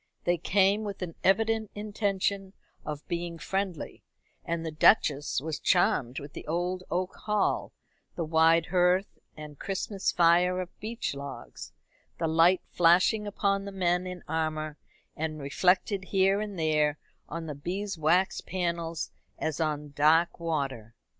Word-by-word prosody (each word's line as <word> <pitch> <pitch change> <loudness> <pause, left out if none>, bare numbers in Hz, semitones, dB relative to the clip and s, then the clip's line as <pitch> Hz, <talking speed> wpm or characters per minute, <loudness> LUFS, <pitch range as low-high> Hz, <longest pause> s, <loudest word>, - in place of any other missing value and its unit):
They 175 -1 +1
came 195 +4 +3
with 200 -3 -5
an 170 -2 -5
evident 220 +2 +2
intention 200 -2 -1 0.3
of 150 -1 -6
being 170 -1 -3
friendly, 190 0 -4 0.4
and 165 0 -3
the 160 - -3
Duchess 150 -4 +3
was 155 0 -4
charmed 135 -8 +2
with 145 +1 -10
the - - -9
old 180 +3 -1
oak 180 +2 -1
hall, 210 -1 0 0.4
the 170 - -2
wide 165 +1 +4
hearth 180 +2 +1 0.2
and 150 -2 -10
Christmas 195 0 -2
fire 175 +2 +4
of 180 -1 -6
beech 225 -3 -3
logs, 140 - -8 0.5
the 165 - -1
light 165 +3 +4
flashing 180 +5 +4
upon 200 -1 0
the 200 - -6
men 180 -1 0
in 180 -1 -7
armour, 155 -1 -2 0.4
and 155 0 -3
reflected 185 +7 +1
here 195 +1 +2
and 205 -3 -5
there 150 -2 +2 0.3
on 165 0 -5
the 155 - -4
beeswaxed 180 +2 0
panels 170 -3 -2 0.3
as 160 0 -2
on 150 -2 -2
dark 160 +5 +3
water. 135 -9 -3
175 Hz, 140 wpm, -28 LUFS, 155-190 Hz, 0.5 s, wide